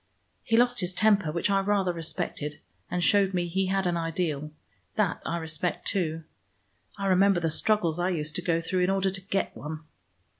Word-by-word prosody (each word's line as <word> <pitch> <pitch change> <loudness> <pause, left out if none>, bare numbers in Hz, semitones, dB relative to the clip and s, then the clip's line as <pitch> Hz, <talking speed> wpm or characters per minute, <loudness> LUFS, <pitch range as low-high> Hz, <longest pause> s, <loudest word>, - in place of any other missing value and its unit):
He 225 - +2
lost 245 +1 +3
his 180 -1 -1
temper, 205 -6 +3
which 170 +5 0
I 195 - +4
rather 195 -2 +1
respected, 150 -2 -4 0.3
and 180 0 -1
showed 195 -1 +3
me 175 -1 0
he 190 +2 0
had 195 0 0
an 175 -1 +1
ideal. 165 -3 -2 0.5
That 200 -5 0
I 170 - -1
respect 165 +1 -3
too. 165 -4 -1 0.7
I 200 - -3
remember 195 0 +4
the 165 -2 -1
struggles 175 -3 +1
I 175 +1 +1
used 155 -4 -1
to - - -2
go 170 -2 +1
through 180 +3 -1
in 180 +1 +2
order 195 0 +1
to 190 0 -2
get 195 +1 -2
one." 155 +1 -6
180 Hz, 190 wpm, -27 LUFS, 165-195 Hz, 0.7 s, I